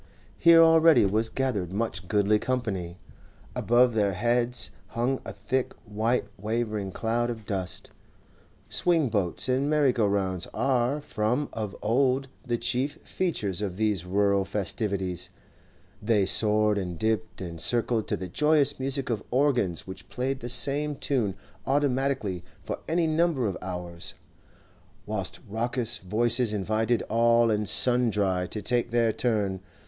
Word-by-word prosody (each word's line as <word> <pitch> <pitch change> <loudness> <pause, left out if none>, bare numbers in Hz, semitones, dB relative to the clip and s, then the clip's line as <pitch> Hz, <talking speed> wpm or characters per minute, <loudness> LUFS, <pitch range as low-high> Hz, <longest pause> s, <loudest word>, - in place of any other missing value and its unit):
Here 165 0 +7
already 165 -5 +6
was 110 +3 +1
gathered 110 -11 -2
much 95 -2 -3
goodly 105 +1 +2
company; 100 -10 -3 0.6
above 120 +1 +3
their 100 -3 +1
heads 120 +4 0 0.2
hung 125 +3 -1
a - - -7
thick 130 -1 -2
white 110 +3 0
wavering 105 -2 -2
cloud 115 +4 -1
of 110 -3 -6
dust. 95 -3 -4 0.8
Swing 165 -6 +2
boats 100 -2 0
and 130 +3 +1
merry 150 -4 +3
go 110 -4 +1
rounds 95 -3 -1
are 135 +2 +1
from 125 +2 -1
of 105 -3 -4
old 130 +4 +1
the 120 -2 -1
chief 125 +4 -1
features 105 - -2
of 95 -3 -3
these 105 -5 0
rural 100 +1 +1
festivities; 95 -2 -2 0.7
they 105 -2 +2
soared 105 +1 +3
and 90 -3 -5
dipped 110 +3 -2
and 85 -3 -6
circled 120 -2 +2
to - - -1
the 95 - -6
joyous 145 - +2
music 135 -1 0
of 110 -4 -2
organs 125 - +1
which 95 +1 -9
played 130 +2 -2
the 120 - -6
same 145 +4 +1
tune 120 -9 0 0.3
automatically 135 -9 0 0.2
for - - -5
any 165 +1 +2
number 160 -4 +1
of 100 -3 -1
hours, 90 -2 -5 0.9
whilst - - -4
raucous 120 +2 -1
voices 115 +4 +1
invited 110 +3 0
all 115 +1 +3
and 105 -1 -1
sundry 105 -7 +4
to 105 +2 -5
take 120 -1 0
their 115 -1 +2
turn. 105 -5 -1
115 Hz, 140 wpm, -27 LUFS, 100-130 Hz, 0.9 s, Here